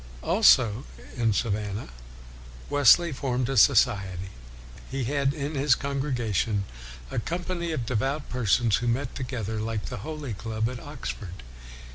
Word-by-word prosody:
Also, 105 Hz, -, +4 dB, 0.3 s
in 115 Hz, -3 st, +2 dB
Savannah, 105 Hz, -, -2 dB, 0.8 s
Wesley 145 Hz, +5 st, +6 dB
formed 130 Hz, -3 st, -1 dB
a 135 Hz, -, -1 dB
society. 100 Hz, -7 st, +3 dB, 0.6 s
He 135 Hz, 0 st, -2 dB
had 140 Hz, +2 st, +1 dB
in 145 Hz, +1 st, -4 dB
his 140 Hz, -2 st, +3 dB
congregation 120 Hz, -8 st, -1 dB, 0.5 s
a -, -, -1 dB
company 170 Hz, +4 st, -3 dB
of 135 Hz, -7 st, -2 dB
devout 135 Hz, +6 st, -1 dB
persons 120 Hz, -2 st, +2 dB
who 120 Hz, -, -3 dB
met 125 Hz, +3 st, -1 dB
to -, -, -7 dB
gether 110 Hz, -4 st, -3 dB
like 110 Hz, -1 st, -3 dB
the 125 Hz, -, -5 dB
Holy 150 Hz, -5 st, -5 dB
Club 110 Hz, +2 st, -2 dB
at 125 Hz, -, -7 dB
Oxford. 115 Hz, -, -7 dB
125 Hz, 135 wpm, -26 LUFS, 110-140 Hz, 0.8 s, Wesley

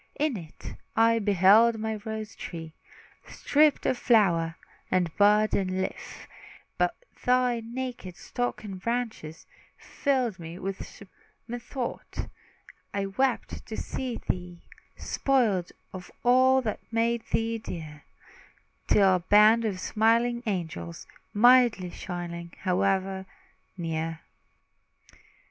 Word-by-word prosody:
In 300 Hz, -3 st, +1 dB
it, 165 Hz, -6 st, -9 dB, 0.2 s
I 230 Hz, 0 st, +4 dB
beheld 205 Hz, +3 st, +5 dB
my 220 Hz, 0 st, -3 dB
rose 220 Hz, -1 st, -5 dB
tree 165 Hz, -2 st, -7 dB, 0.5 s
Stripped 295 Hz, 0 st, +2 dB
of 250 Hz, -, +1 dB
flower, 170 Hz, -8 st, +3 dB, 0.3 s
and 175 Hz, -3 st, 0 dB
bud 210 Hz, +1 st, +4 dB
and 185 Hz, -1 st, 0 dB
leaf; 190 Hz, -, -5 dB, 0.5 s
While -, -, +3 dB, 0.3 s
thy 250 Hz, -1 st, +2 dB
naked 235 Hz, -5 st, -6 dB
stalk 245 Hz, -3 st, -3 dB
and 195 Hz, -3 st, -7 dB
branches 225 Hz, -9 st, -3 dB, 0.3 s
Filled 255 Hz, -8 st, -1 dB
me 165 Hz, +1 st, -8 dB
with 195 Hz, +1 st, -4 dB
surprise 200 Hz, -2 st, -16 dB, 0.3 s
and 240 Hz, +1 st, -4 dB
grief. -, -, -25 dB
Then, 260 Hz, -3 st, -2 dB
methought, -, -, -6 dB, 0.7 s
I 200 Hz, -1 st, 0 dB
wept 250 Hz, +6 st, -1 dB
to 220 Hz, -, -6 dB
see 255 Hz, -3 st, -4 dB
thee 175 Hz, -1 st, -4 dB, 0.3 s
Spoiled 220 Hz, -10 st, +1 dB, 0.2 s
of 185 Hz, -1 st, -8 dB
all 260 Hz, +2 st, +5 dB
that 215 Hz, -3 st, -2 dB
made 230 Hz, +1 st, +1 dB
thee 225 Hz, 0 st, 0 dB
dear, 155 Hz, -7 st, -8 dB, 0.8 s
Till 190 Hz, -2 st, +5 dB
a -, -, -5 dB
band 210 Hz, +5 st, +5 dB
of 195 Hz, -4 st, -2 dB
smiling 230 Hz, +4 st, +2 dB
angels 170 Hz, -3 st, -4 dB, 0.3 s
Mildly 235 Hz, -5 st, +5 dB
shining, 170 Hz, -2 st, -6 dB
hovered 190 Hz, 0 st, 0 dB, 0.5 s
near. 165 Hz, -1 st, -3 dB
210 Hz, 120 wpm, -27 LUFS, 180-235 Hz, 0.8 s, beheld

